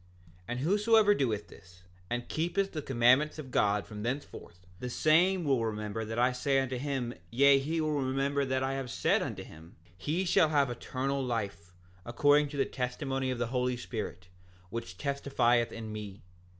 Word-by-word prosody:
7:16 90 - -29 0.4
And 120 +1 -3
whosoever 210 +5 +4
doeth 115 - -1
this, 90 -1 -17 0.3
and 120 0 -3
keepeth 185 +5 -1
the 155 - -4
commandments 130 +4 +3
of 140 -4 -8
God 105 -2 +2
from 105 0 -8
thenceforth, 115 -7 -6
the 125 - -4
same 175 +7 +3
will 135 -6 +2
remember 105 0 -3
that 110 +1 -5
I 125 +2 +3
say 135 +2 +1
unto 130 -1 -2
him, 135 -3 -2 0.2
yea, 140 +4 +5
he 160 +4 -2
will 155 -1 0
remember 135 +2 0
that 130 -1 0
I 135 +1 -1
have 135 -2 -4
said - - +1
unto - - -4
him, 80 +2 -14 0.2
he 160 - -1
shall 165 -2 +4
have 140 -4 +2
eternal 135 +3 -2
life, 100 -7 -4 0.3
according 145 +6 +3
to 145 - -7
the 135 - +2
testimony 135 +1 -3
of 130 - -2
the 120 - 0
Holy 125 -1 0
Spirit, 105 -7 -6 0.4
which 90 -6 -6
testifieth 125 -4 +1
in 110 -1 -7
me. 105 -2 -8
130 Hz, 175 wpm, -30 LUFS, 115-145 Hz, 0.4 s, yea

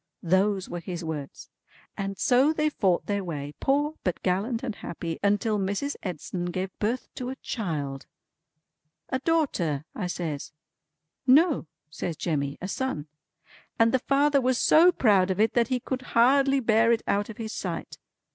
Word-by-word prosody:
Those 190 +2 +2
were 175 - -5
his 175 0 -6
words. 150 -4 -6 0.4
And 195 0 -4
so 265 +5 +4
they 305 -1 +1
fought 185 -9 +1
their 200 -1 -1
way, 145 -4 -5
poor 290 +3 +1
but 180 -3 -2
gallant 215 +7 0
and 240 -4 -2
happy, 165 -1 -5
until 205 +1 +1
Mrs. 200 +9 -2
Edson 175 0 -4
gave 185 +2 -3
birth 230 +4 -1
to 250 -1 -5
a 265 - -4
child." 150 - -4 1.0
"A 260 - -1
daughter," 225 - 0
I 185 - -3
says. 160 -5 -4 0.7
"No," 290 - +5 0.2
says 165 0 -4
Jemmy, 140 -4 -2
"a 185 - -5
son. 190 - -3 0.7
And 225 0 +4
the 260 - +2
father 280 +2 +3
was 255 0 +2
so 340 +6 +6
proud 200 - +3
of 190 +1 -1
it 220 +1 +3
that 235 -1 +3
he 255 -1 0
could 260 +1 -4 0.2
hardly 270 +3 +5
bear 230 -1 +3
it 230 -1 +1
out 205 +2 0
of 225 - -8
his 220 -1 -5
sight. - - -5
205 Hz, 165 wpm, -27 LUFS, 175-260 Hz, 1.0 s, so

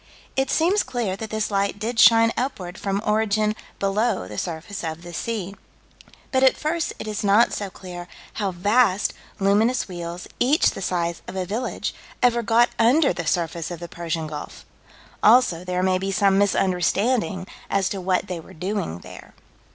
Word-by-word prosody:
It 270 0 +1
seems 365 +6 +3
clear 230 -7 -2
that 220 +1 -6
this 220 0 -2
light 200 0 0
did 225 +3 -3
shine 230 0 +7
upward 190 -9 -4
from 200 +1 -2
origin 215 0 +1 0.2
below 200 - 0
the 105 +1 -5
surface 175 +4 -5
of 160 +1 -5
the 175 0 -9
sea. 200 -1 -3 0.8
But 260 - +2
at 265 -1 +5
first 320 +2 -1
it - - -7
is 210 -1 -3
not 205 +4 +4
so 200 -2 -3
clear 175 -1 -9 0.3
how 200 - +1
vast 205 +2 +2 0.3
luminous 210 +6 +2
wheels, 175 -1 -6
each 280 +6 +4
the - - -7
size 170 -2 -1
of - - -7
a 185 -1 -1
village, 220 +7 -3 0.3
ever 240 -1 +4
got 235 +1 +4
under 270 +6 +4
the - - -5
surface 170 -2 -1
of 175 -2 -6
the 170 - -6
Persian 165 -1 -3
Gulf: 150 -1 -8 0.6
also 215 -7 +5
there 180 0 -1
may 185 0 +2
be 195 +1 -2
some 195 0 +3
misunderstanding 195 +2 +1 0.2
as 195 -1 +1
to 195 - -4
what 185 +1 +1
they 180 -3 -5
were 175 +3 -13
doing 180 - -3
there. - - -12
200 Hz, 175 wpm, -23 LUFS, 180-225 Hz, 0.8 s, shine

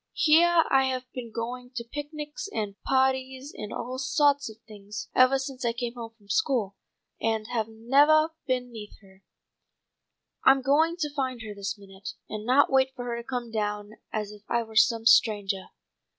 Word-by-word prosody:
Heah 335 +2 +5
I 265 0 +5
have 255 -1 -2
been 240 -3 -7
going 245 +2 -5
to 235 - -3
picnics 295 - -6
and 210 - -3 0.2
pahties 265 +1 0
and 210 - -7
all 255 +1 -5
sawts 285 0 +2
of 220 - -12
things 210 0 -8
evah 255 +1 +5
since 270 -1 -6
I 235 -1 +1
came 240 0 -4
home 230 -2 -9
from 205 -3 -25
school, 230 -5 0 0.5
and 220 -1 0
have 225 -3 -1
nevah 285 +8 +4 0.2
been 250 -1 -1
neah 215 -3 -8
her. 190 0 -20 1.2
I'm 265 0 +5
going 315 +5 +3
to 300 -2 -2
find 260 -5 -3
her 215 -1 -7
this 200 +1 -4
minute, 195 0 -10
and 215 +1 -6
not 270 +3 +4
wait 265 0 +3
for 245 -2 -6
her 235 -1 -3
to 235 - -6
come 245 -2 -4
down 210 -1 -3 0.2
as 210 -1 -3
if 210 -1 -13
I 235 0 +1
were 220 -1 -14
some 225 +1 +4
strangah." 205 -4 +3
245 Hz, 180 wpm, -27 LUFS, 215-270 Hz, 1.2 s, Heah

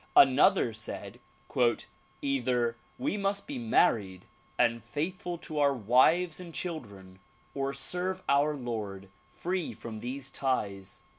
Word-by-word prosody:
Another 135 - +6
said 110 - -7 1.0
"Either 125 -4 +1 0.2
we 255 -4 -1
must 200 0 -1
be 285 -3 -5
married 110 - +2 0.3
and 115 -2 +2
faithful 170 +7 -3
to 155 -2 -5
our 140 -1 +4
wives 135 - +4
and 170 -3 -9
children 100 - -6 0.3
or 135 0 -1
serve 180 +7 -2
our 145 +2 +3
Lord 105 -7 -5 0.2
free 180 -1 -3
from 110 -2 -7
these 135 +4 -5
ties. 100 -9 -2
135 Hz, 120 wpm, -30 LUFS, 115-175 Hz, 1.0 s, Another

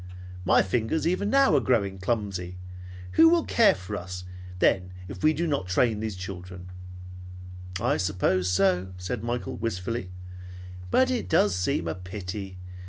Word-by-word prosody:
My - - +5
fingers 115 +10 -1
even 185 +4 0
now 275 +1 +4
are - - +5
growing 100 -6 0
clumsy. 95 -4 -2 0.5
Who 325 0 +7
will 340 -1 +3
take - - -7
care 230 -3 +7
of 90 +3 -10
us 90 -2 -5 0.3
then 90 0 +2
if - - -9
we 155 - +6
do 160 +3 -1
not 140 - -1
train 105 +4 +2
these 110 -2 -3
children?" 90 -1 -8 1.1
"I 125 +7 +1
suppose 95 -1 +1
so," 90 0 +1
said 100 +5 -4
Michael 120 0 -3
wistfully, 115 0 -3 0.8
"But 260 - +3
it 250 - -2
does 100 -3 +3
seem 90 -2 -1
a 80 - -1
pity. 95 +1 -7
100 Hz, 155 wpm, -26 LUFS, 90-120 Hz, 1.1 s, Who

